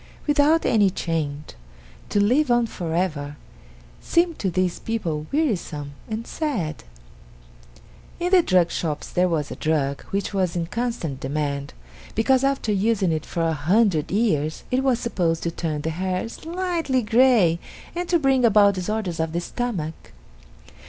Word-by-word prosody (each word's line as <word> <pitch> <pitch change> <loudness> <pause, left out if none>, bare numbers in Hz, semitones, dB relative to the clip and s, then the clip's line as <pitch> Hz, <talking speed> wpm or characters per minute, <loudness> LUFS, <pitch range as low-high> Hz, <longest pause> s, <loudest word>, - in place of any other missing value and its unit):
Without 295 +2 +3
any 210 -4 +4
change, 155 -5 -3 0.6
to 205 - +1
live 255 +8 +3
on 240 -1 +4
forever, 165 -7 -3 0.6
seemed 340 -1 +1
to 195 - 0
this 185 0 0
people 165 -9 -3
wearisome 180 - -1 0.2
and 220 +1 -4
sad. 210 - -3 1.4
In 350 +1 -1
the 375 -2 +7
drug 180 - +3
shops 155 -3 -3
there 180 +1 +2
was 155 -4 -1
a - - -4
drug 140 -3 0
which 200 +1 -3
was 185 -3 0
in 170 -1 -1
constant 180 - -3
demand, 140 0 -3 0.4
because 260 +4 +3
after 275 -5 +1
using 200 -2 +1
it 155 -1 -2
for 170 - -2
a 165 -1 +1
hundred 165 +1 +2
years, 160 -8 0
it 255 +1 +2
was 260 -3 +3
supposed 175 -9 -1
to 170 - -1
turn 155 -3 -3
the 160 - -2
hair 185 +4 -2
slightly 330 -2 -2
gray 220 -7 +4 0.4
and 350 0 -3
to 350 - +4
bring 270 -4 +2
about 205 -3 +6
disorders 185 -2 -3
of 160 0 -1
the 170 - 0
stomach. 175 -6 -4
190 Hz, 150 wpm, -23 LUFS, 160-245 Hz, 1.4 s, the